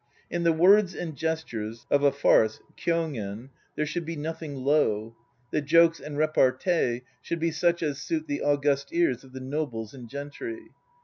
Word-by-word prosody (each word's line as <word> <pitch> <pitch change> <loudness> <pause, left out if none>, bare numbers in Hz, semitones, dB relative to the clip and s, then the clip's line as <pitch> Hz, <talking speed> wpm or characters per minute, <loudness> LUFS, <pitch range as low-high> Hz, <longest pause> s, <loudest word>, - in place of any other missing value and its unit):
In 175 - -1
the 170 -1 +4
words 185 +4 +5
and 165 -4 -5
gestures 120 -8 -3
(of 140 - +4
a 140 -1 +5
farce, 110 -6 +3 0.2
kyogen) 135 -8 -2 0.2
there 150 - 0
should 170 +3 -3
be 165 +1 -5
nothing 155 -1 -5
low. 120 -6 +1 0.4
The 150 - +1
jokes 165 +3 +5
and 145 -1 -7
repartee 130 -3 +2 0.2
should 170 - -3
be 165 +1 +1
such 170 +2 +1
as 145 -2 -2
suit 320 -2 -2
the 290 -1 -3
august 140 -1 +1
ears 165 -8 +1
of 135 - -16
the 130 - -7
nobles 130 -5 -4
and 125 -4 -10
gentry. 330 - -7
150 Hz, 170 wpm, -27 LUFS, 130-165 Hz, 0.4 s, words